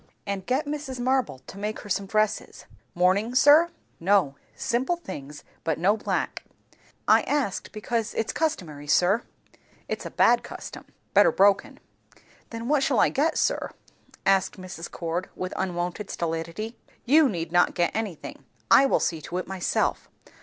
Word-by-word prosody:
And 195 -2 -4
get 265 +5 +1
Mrs. 290 -3 -5
Marble 255 - 0
to 195 - -10
make 210 +1 -3
her - - -11
some 195 +1 -1
dresses." 215 +1 -1 0.3
"Mourning, 195 +7 +2
sir?" 295 +6 +7 0.3
"No. 185 -5 +3 0.2
Simple 255 +8 0
things, 145 - -9 0.2
but 160 - 0
no 190 +6 +3
black." 220 - -2 0.7
"I - - +6
asked, 280 -10 -2
because 225 +1 -3
it's 225 - -1
customary, 160 - -2
sir." 180 +9 +3 0.7
"It's - - -4
a - - -5
bad - - +4
custom; - - -9 0.3
better - - +6
broken." 195 0 +3 0.7
"Then 230 0 -6
what 295 0 +3
shall 265 -5 +2
I - - +5
get, 305 +4 +1
sir?" - - 0 0.6
asked 195 -1 +2
Mrs. 185 -2 -7
Cord 170 +2 -4
with 185 0 -4
unwonted 180 +2 -3
stolidity. 170 +7 -4 0.3
"You 295 +3 +5
need 165 -5 -4
not 175 0 +3
get 175 -1 +1
anything. 210 -8 -5 0.3
I 275 - +7
will - - +2
see 160 -2 -1
to 175 - -5
it 185 - -3
myself. 190 -1 -1
200 Hz, 155 wpm, -26 LUFS, 175-245 Hz, 0.7 s, sir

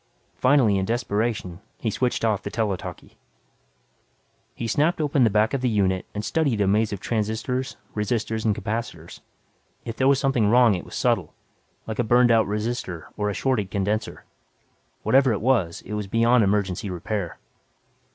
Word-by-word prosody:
Finally, 125 -7 +3
in 95 - -1
desperation, 110 -5 -2 0.2
he 110 - -2
switched 125 +1 0
off 110 -3 +1
the - - -5
tele 110 -4 -1
talkie. - - -10 1.4
He 115 - -4
snapped 150 +10 +1
open 145 -3 +2
the 115 - +5
back 110 +3 +2
of 135 - -1
the 125 - +1
unit 95 -4 0
and 105 +1 -3
studied 145 +1 +1
the 100 - +2
maze 105 +2 +2
of 100 - -4
transistors, 115 +5 -2 0.2
resistors, 110 +1 -1
and 110 -2 +2
capacitators. 105 -8 -5 0.7
If 115 -1 -6
there 130 - +2
was 140 0 +5
something 135 -6 +2
wrong 120 -1 +5
it 90 - -4
was - - -10
subtle, - - 0 0.5
like 110 +1 -5
a - - +3
burned 120 +1 +4
out 110 -3 +4
resistor 105 -5 -3
or 105 -1 -1
a 100 - -3
shorted 120 -8 0
condenser. 100 +3 -2 0.8
Whatever 130 -2 +4
it 100 - -2
was, 110 -9 +1
it 105 - -7
was 105 -1 -3
beyond 115 +3 +3
emergency 100 0 0
repair. 90 +1 -4
110 Hz, 170 wpm, -24 LUFS, 100-120 Hz, 1.4 s, the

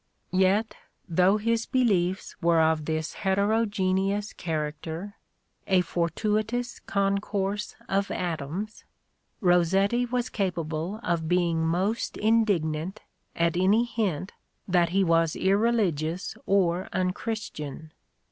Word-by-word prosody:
Yet, 195 +4 +3 0.2
— - - -47
though 185 +3 +3
his 230 +1 0
beliefs 195 -8 +1
were 170 -1 +4
of 160 -1 +2
this 160 0 -2
heterogeneous 200 0 0
character, 160 +3 -4 0.5
a 190 -2 +4
for 170 -1 -1
tuitous 220 +6 -1
concourse 200 +1 -1
of 200 +1 0
atoms, 175 +4 -4 0.2
" - - -48
— - - -46
Rossetti 195 +8 +3
was 245 0 -1
capable 175 -1 -2
of 165 -2 -1
being 170 -2 +2
most 190 +7 -1
indignant 195 -5 +1 0.3
at 170 0 +1
any 195 +6 +4
hint 205 -7 -2 0.4
that 175 -2 +3
he 195 +3 +2
was 165 -2 +2
irreligious 190 -5 +1
or 185 -2 +2
unchristian. 180 -5 -3
190 Hz, 110 wpm, -27 LUFS, 170-210 Hz, 0.5 s, were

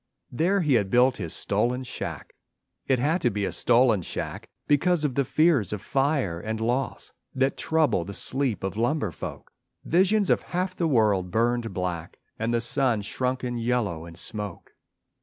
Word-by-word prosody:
There 180 +9 +2
he 150 -5 +2
had 105 -5 +2
built 125 +4 +4
his 85 -6 -4
stolen 125 +2 0
shack. 125 - -6 0.5
It 130 - +3
had 155 +8 +1
to 120 - +3
be 105 -2 -2
a - - -2
stolen 120 -4 +3
shack - - -5 0.2
Because 155 +3 +3
of 140 - 0
the 140 - +2
fears 150 - +2
of 105 - -3
fire 135 - 0
and 110 +4 -4
loss 120 +4 -1 0.2
That 135 +1 +1
trouble 155 - +1
the 100 +3 -7
sleep 130 -6 -2
of 95 -1 -2
lumber 120 - 0
folk: - - -8 0.3
Visions 190 +4 +3
of - - +3
half 185 +1 -3
the 170 - 0
world 105 - +2
burned 115 +2 0
black 90 -3 -4 0.2
And 115 +1 0
the 120 0 +1
sun 120 -3 +1
shrunken 125 +2 -2
yellow 115 -9 -1
in 85 - -11
smoke. 105 +1 -5
120 Hz, 170 wpm, -26 LUFS, 105-140 Hz, 0.5 s, built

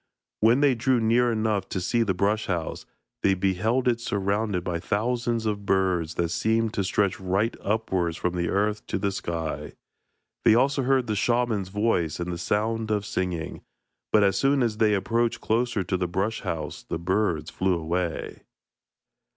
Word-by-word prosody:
When 115 +5 +4
they 145 -2 +5
drew 125 +1 +2
near 120 +2 +3
enough 110 -3 0
to - - -2
see 115 +6 +1
the 100 -5 +1
brush 105 +4 0
house, 85 -3 -3 0.3
they 95 - +3
beheld 110 +7 +1
it 120 -1 +2
surrounded 100 -2 -1
by 85 -1 -2
thousands 115 +4 -1
of 105 -2 -1
birds 90 -4 +1
that 85 -1 0
seemed 110 +5 +1
to 100 - 0
stretch 95 0 0
right 95 +5 0
upwards 95 -6 0
from 90 0 -1
the 85 -1 -1
earth 105 +2 0
to - - -1
the 100 +1 0
sky. 85 -4 -4 0.7
They 110 - +6
also 135 +3 +2
heard 130 -1 +2
the 110 -2 -1
shaman's 115 -3 +1
voice 100 -6 0
and 90 +1 -3
the 85 - -5
sound 110 +4 -1
of 105 -1 0
singing, 90 -5 -3 0.5
but 105 - +5
as 95 -1 +2
soon 135 -1 +3
as 110 -3 -1
they 110 -2 +3
approached 115 +4 0
closer 115 -2 0
to 95 +1 -1
the 90 -1 -1
brush 95 +6 -1
house, 80 -1 -4
the - - -4
birds 85 -3 0
flew 95 -1 +1
away. 85 +1 -3
100 Hz, 175 wpm, -26 LUFS, 90-115 Hz, 0.7 s, They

